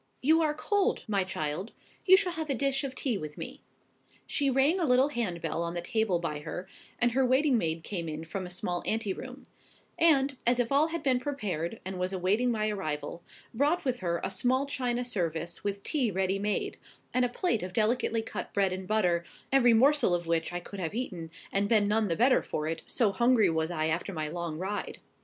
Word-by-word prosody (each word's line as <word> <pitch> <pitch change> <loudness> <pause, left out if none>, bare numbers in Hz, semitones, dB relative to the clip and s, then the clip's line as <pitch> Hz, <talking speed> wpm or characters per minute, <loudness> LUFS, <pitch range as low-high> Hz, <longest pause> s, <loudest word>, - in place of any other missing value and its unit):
"You 320 +4 +5
are 300 -2 +1
cold, 410 +6 0
my 200 -3 +1
child. 180 +2 -4 0.3
You 375 +1 +9
shall 380 -2 0
have 320 -2 -4
a 275 - +1
dish 275 +2 0
of 265 -1 -4
tea 245 -8 -1
with 150 -1 -7
me." - - -6 0.6
She 280 -1 +1
rang 270 +7 +3
a 340 - +1
little 260 +1 +4
hand 210 - -2
bell 170 - -2
on 170 0 -3
the - - -1
table 220 -3 +1
by 160 -3 -3
her, 170 +4 -6 0.3
and 240 0 +3
her 265 +3 +2
waiting 260 +2 +3
maid 165 -6 -1
came 170 -5 -4
in 155 +1 -5
from 185 +3 -5
a - - -9
small 175 0 -1
anteroom; 215 -3 -3 0.6
and, 280 -4 +4
as 245 +1 +4
if 245 0 0
all 285 +3 +4
had 330 -2 -4
been 260 -3 +2
prepared, 215 - -3
and 190 -1 -5
was 180 +1 -1
awaiting 195 +7 +1
my 215 -2 0
arrival, 155 -5 -4 0.3
brought 295 +8 +1
with 250 -2 0
her 170 -2 -1
a - - -1
small 255 +8 +1
china 250 -3 -1
service 170 -6 -2
with 200 0 -3
tea 265 -7 +1
ready 190 0 0
made, 210 +1 -2 0.3
and 255 - +3
a 245 - +2
plate 245 - 0
of 180 +1 -5
delicately 225 +2 +1
cut 205 -4 -6
bread 195 -2 +2
and 185 0 -6
butter, 180 -5 +2 0.3
every 255 -3 +5
morsel 260 -5 +5
of 175 0 -3
which 165 0 0
I 175 - -3
could 195 +3 -9
have 175 +2 -3
eaten, 180 -10 -4 0.2
and 200 +1 +1
been 215 -3 +4
none 215 +1 +2
the 165 - 0
better 255 +6 +4
for 150 - -3
it, 165 0 -3
so 225 -5 +2
hungry 225 -2 +4
was 160 0 0
I 155 -3 -1
after 170 +5 -2
my 155 -2 -3
long 170 -1 -4
ride. 195 +4 -4
210 Hz, 215 wpm, -29 LUFS, 175-255 Hz, 0.6 s, You